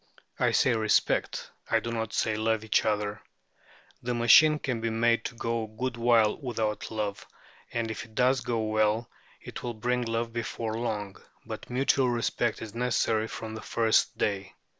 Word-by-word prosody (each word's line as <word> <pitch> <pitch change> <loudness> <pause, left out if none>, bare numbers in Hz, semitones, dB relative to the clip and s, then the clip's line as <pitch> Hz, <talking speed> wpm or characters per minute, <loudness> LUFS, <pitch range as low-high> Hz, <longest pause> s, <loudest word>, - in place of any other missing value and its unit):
I - - +3
say 130 - +3
respect, 110 -2 +1 0.2
I - - +3
do 115 - -5
not 110 -1 -3
say 110 -1 0
love, 110 0 0
each 110 - +2
other. 105 -1 -1 0.8
The 120 0 -2
machine 150 +6 +7
can 130 -6 -3
be 115 - 0
made 115 +1 +2
to 120 - -4
go 115 -1 -2
a - - -11
good 120 +3 -4
while 115 -2 +3
without 110 -6 -3
love, 105 -2 -4 0.4
and 115 -1 -2
if 110 - -5
it 110 -1 -20
goes 125 +1 +3
well 110 -1 +1 0.3
it - - -8
will 120 -1 -4
bring 125 +3 0
love 115 0 -2
before 115 -1 -3
long; 110 -4 -3 0.3
but - - -7
mutual 130 +1 +2
respect 120 -1 -1
is 110 -2 -8
necessary 115 -2 +1
from 110 -1 -6
the 110 - -6
first 115 -1 +2
day. 100 -2 -2
115 Hz, 170 wpm, -28 LUFS, 110-120 Hz, 0.8 s, machine